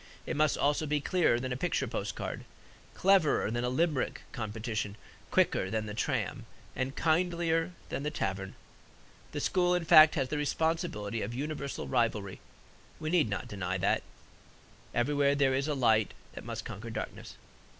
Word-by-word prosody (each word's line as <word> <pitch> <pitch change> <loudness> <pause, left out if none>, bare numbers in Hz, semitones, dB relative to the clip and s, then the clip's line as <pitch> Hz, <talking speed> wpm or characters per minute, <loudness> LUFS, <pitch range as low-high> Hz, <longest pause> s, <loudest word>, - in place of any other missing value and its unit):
It - - -3
must 155 0 +2
also 145 +2 +1
be 150 0 +1
clearer 145 -5 +2
than 130 0 -3
a - - -3
picture 130 - 0
postcard, - - -4 0.5
cleverer 185 - +3
than 120 +1 -1
a 125 - +1
Limerick 150 0 0
competition, 110 -2 -3 0.3
quicker 95 - +2
than 110 +1 -1
the 105 - -5
tram, 110 - -2 0.3
and 130 +2 -2
kindlier 165 0 +1 0.2
than - - -3
the 150 - -1
tavern. 95 -8 -3 0.8
The - - -3
school, 180 -1 +2
in 175 -2 -1
fact, 155 0 +8
has 130 - 0
the 150 - -1
responsibility 150 - -1
of 110 +4 -4
universal 140 0 -4
rivalry. 110 -6 0 0.6
We 155 0 -3
need 165 -10 +3
not 100 - -3
deny 95 -2 -3
that 100 +2 +1 0.9
everywhere 140 +3 +2
there 140 -2 +3
is 135 +2 0
a 150 - 0
light 110 -5 +3 0.2
that - - -9
must - - -5
conquer 110 +4 -7
darkness. 110 - -6
135 Hz, 160 wpm, -31 LUFS, 110-155 Hz, 0.9 s, fact